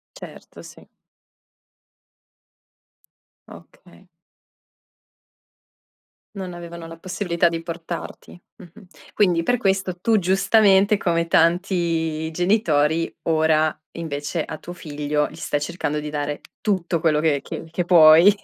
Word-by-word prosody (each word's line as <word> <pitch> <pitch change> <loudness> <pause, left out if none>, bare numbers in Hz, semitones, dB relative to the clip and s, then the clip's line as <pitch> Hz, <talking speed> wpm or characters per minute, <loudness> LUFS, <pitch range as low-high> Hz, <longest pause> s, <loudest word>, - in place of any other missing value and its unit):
Certo, - - -12
sì. - - -15 2.6
Okay. - - -17 2.3
Non 185 -2 -6
avevano 170 -1 -9
la 165 0 -11
possibilità 175 -1 -1
di 165 -1 -3
portarti, 170 0 -7 0.2
mh-mh. 185 +1 -16 0.3
Quindi 175 -5 +2
per 245 +7 +1
questo 190 -3 0
tu, 220 +3 +2
giustamente, 195 +2 +3
come 170 -2 0
tanti 165 -2 +1
genitori, 165 -4 +1
ora, 155 -1 +2 0.3
invece, 155 0 -4
a - - -7
tuo 175 - -10
figlio 150 -2 -2
gli 155 - -13
stai 145 -3 -3
cercando 150 -2 -3
di 150 0 -6
dare 145 0 -4 0.2
tutto 180 -5 -1
quello 155 -2 +2
che 150 -3 +1
che - - -7
che 175 +1 -3
puoi. 170 +3 +7
170 Hz, 110 wpm, -22 LUFS, 155-185 Hz, 2.6 s, puoi